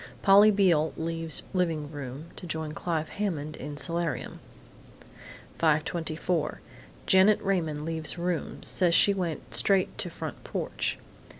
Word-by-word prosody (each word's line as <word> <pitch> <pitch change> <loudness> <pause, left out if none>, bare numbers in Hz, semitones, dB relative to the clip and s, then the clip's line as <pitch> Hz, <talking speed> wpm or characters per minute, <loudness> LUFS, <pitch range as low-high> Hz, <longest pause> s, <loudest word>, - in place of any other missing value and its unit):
Polly 200 +2 +7
Beale 180 -7 +3
leaves 165 -1 -3
living 165 -5 -1
room 145 +3 -7
to 180 - -8
join 160 -1 -3
Clive 160 0 -2
Hammond 155 -7 -3
in 145 0 -7
solarium. 165 -2 -2 1.2
5:24 160 0 0 0.5
Janet 190 +2 +5
Raymond 160 -6 -1
leaves 160 0 0
room; 175 -1 -3
says 175 -2 +2
she 200 - +6
went 170 -10 -4
straight 185 +12 +3
to - - -2
front - - -7
porch. - - -3
165 Hz, 120 wpm, -28 LUFS, 155-180 Hz, 1.2 s, Polly